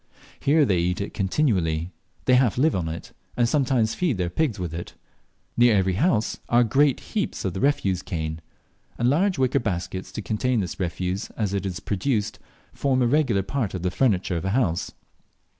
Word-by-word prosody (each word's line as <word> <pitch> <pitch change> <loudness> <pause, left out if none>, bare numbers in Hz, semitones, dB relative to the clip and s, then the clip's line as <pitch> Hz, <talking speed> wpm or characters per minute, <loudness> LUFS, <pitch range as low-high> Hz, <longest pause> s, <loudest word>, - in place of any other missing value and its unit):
Here 150 +1 +4
they 95 -7 +2
eat 90 +1 0
it 100 - -4
continually. 95 - 0 0.3
They 130 - +4
half 125 -4 +3
live 155 +5 +3
on 85 -3 -1
it, 80 +1 -7 0.3
and 120 -1 +3
sometimes 125 -5 +1
feed 165 - 0
their 90 -1 -1
pigs 140 - 0
with 90 -4 -4
it. 85 +1 -7 0.6
Near 120 -2 +5
every 95 -1 +2
house 110 - +1
are 120 +1 +5
great 135 +4 +3
heaps 210 - -2
of 95 - -1
the 95 - -4
refuse 100 -11 +1
cane; 80 -3 -4 0.6
and 120 +2 +2
large 185 +5 +2
wicker 130 -2 +2
baskets 95 -3 -4
to 110 - -5
contain 120 +3 0
this 90 -1 -5
refuse 90 +1 -2
as 105 -3 -1
it 100 -1 -1
is 90 -2 -4
produced 105 +1 -1 0.3
form 130 -2 +1
a - - +3
regular 125 -7 +2
part 115 -3 -2
of 90 - -5
the 90 - 0
furniture 95 -7 +1
of 85 - -4
a - - 0
house. 90 -10 0
105 Hz, 190 wpm, -24 LUFS, 90-130 Hz, 0.6 s, Near